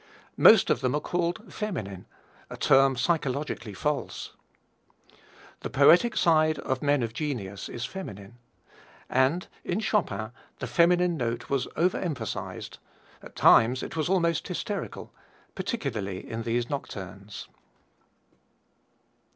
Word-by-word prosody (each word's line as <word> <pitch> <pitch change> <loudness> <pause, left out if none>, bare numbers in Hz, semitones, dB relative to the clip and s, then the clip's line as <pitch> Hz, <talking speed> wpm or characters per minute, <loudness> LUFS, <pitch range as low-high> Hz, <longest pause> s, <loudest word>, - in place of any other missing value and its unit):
Most 220 -3 +7
of - - +1
them 130 +2 +1
are - - +1
called 175 +7 -3
feminine, 105 - -5 0.4
a - - -8
term 135 0 +4
psychologically 140 - -1
false. 150 +6 -3 1.3
The - - -5
poetic 175 - +5
side 155 -2 +3
of 130 -2 -3
men 145 -3 +2
of 115 -1 -3
genius 110 -9 -4
is 120 0 -4
feminine, 120 - -8 0.7
and 135 +8 +2 0.2
in 180 - -1
Chopin 110 - -1 0.3
the - - -4
feminine 170 +6 +3
note 120 -1 -3
was 140 -2 0
over 175 +3 +1
emphasized 140 - -5 0.4
at - - -13
times 125 +3 +5
it - - -6
was 160 +1 -1
almost 170 -4 +1
hysterical 195 +2 -5 0.4
particularly 110 - -4
in 115 0 -4
these 120 +1 -1
nocturnes. 100 -7 -7
140 Hz, 120 wpm, -27 LUFS, 115-170 Hz, 1.3 s, Most